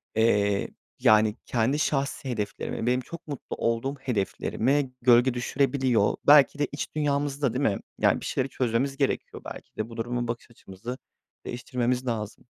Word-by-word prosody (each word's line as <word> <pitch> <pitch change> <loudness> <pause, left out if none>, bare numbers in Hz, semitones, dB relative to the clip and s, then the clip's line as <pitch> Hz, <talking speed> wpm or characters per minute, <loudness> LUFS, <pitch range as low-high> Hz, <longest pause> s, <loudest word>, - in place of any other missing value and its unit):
eee, 105 -3 +2 0.3
yani, 110 0 +5
kendi 125 +5 +1
şahsi 140 -2 -1
hedeflerime, 110 -1 -3
benim 125 +1 +2
çok 170 +6 -10
mutlu 145 -3 -6
olduğum 115 +4 -1
hedeflerime 130 +3 0
gölge 120 +1 +5
düşürebiliyor. 130 -3 +1
Belki 145 0 +7
de 145 - +2
iç 145 - -5
dünyamızda, 145 -3 0
değil 135 +3 -1
mi? 100 - +1 0.2
Yani, - - +3
bir - - -6
şeyleri 135 +1 -1
çözmemiz 130 +3 0
gerekiyor 135 -2 -1
belki - - -9
de. 110 +1 -3
Bu 115 - -10
duruma 120 +1 -2
bakış 115 +1 -5
açımızı 115 +3 -8 0.5
değiştirmemiz 125 0 -2
lazım. 110 -3 -4
125 Hz, 150 wpm, -27 LUFS, 115-140 Hz, 0.5 s, Belki